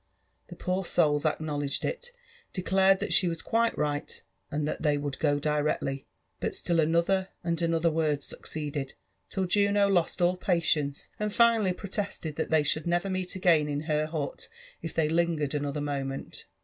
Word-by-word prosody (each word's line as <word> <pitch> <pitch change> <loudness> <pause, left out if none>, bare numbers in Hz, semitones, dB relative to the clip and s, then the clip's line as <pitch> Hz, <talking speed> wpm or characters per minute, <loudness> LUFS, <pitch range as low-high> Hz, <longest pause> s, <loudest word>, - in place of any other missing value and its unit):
The - - -10
poor 185 +1 -1
souls 150 -4 +2
acluiowledged 145 -2 -1
it, 485 -1 -3 0.5
declared 190 +1 +3
that - - 0
she 185 - +5
was 165 -1 -3
quilQ 230 0 +1
right, 145 -1 -2 0.3
and 150 0 -1
lliat - - -3
they 150 -2 +2
would 145 -1 -4
go 145 -2 +2
directly; 145 -2 -1 0.3
but - - -2
still 170 -1 0
another 170 +4 +2 0.2
and 170 0 -1
another 165 0 +2
word 155 -3 0
succeeded, 145 -3 -5 0.3
till 190 - -1
Juno 200 +2 +3
lost 180 -3 +1
all 180 +1 +3
patience, 160 -6 0
and 210 0 -1
finally 230 -3 +4
protested 195 -4 -4
that 160 - -1
they 155 -1 +4
should 155 +2 0
never 175 +3 +1
meet 185 -1 -2
again 165 -5 +3
in 145 0 -1
her 155 -1 0
hut 155 -3 -4 0.3
if 165 - -5
they 160 -2 +1
lingered 160 -3 +1
another 145 0 -2
moment. 135 -2 -4
160 Hz, 165 wpm, -28 LUFS, 150-185 Hz, 0.5 s, she